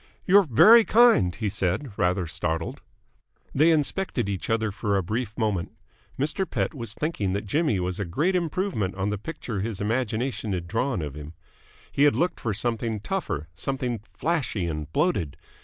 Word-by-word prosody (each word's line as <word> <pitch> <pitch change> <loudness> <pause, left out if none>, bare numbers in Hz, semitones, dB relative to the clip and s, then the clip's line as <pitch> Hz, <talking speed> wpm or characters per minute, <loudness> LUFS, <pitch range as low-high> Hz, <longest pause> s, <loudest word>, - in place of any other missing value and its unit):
"You're 195 -1 +6
very 215 - +8
kind," 215 - +5
he 110 - -2
said, 100 +5 -1
rather 90 0 +1
startled. 80 0 -3 0.7
They 155 +5 +4
inspected 155 - 0
each 95 -3 -4
other 110 -1 +1
for 100 0 -1
a 95 - 0
brief 110 +4 -3
moment. 105 -7 -1 0.4
Mr. 155 +6 -1
Pett - - -1
was 115 -6 -6
thinking 110 - -1
that 100 +1 -2
Jimmy 135 - +1
was 90 +1 -2
a - - 0
great 150 - 0
improvement 170 - -1
on 100 +1 -1
the 105 - -3
picture 120 -5 -5
his 105 0 -3
imagination 115 0 -1
had 90 -2 -3
drawn 115 - -1
of 75 -2 -5
him. 75 +2 -9 0.6
He 140 - +3
had 145 - +4
looked 175 +1 0
for 110 - -2
something 115 +1 -1
tougher, 105 - -3
something 125 +6 -2
flashy 150 - -1
and 75 -2 -4
bloated. 145 - 0
110 Hz, 170 wpm, -25 LUFS, 95-150 Hz, 0.7 s, very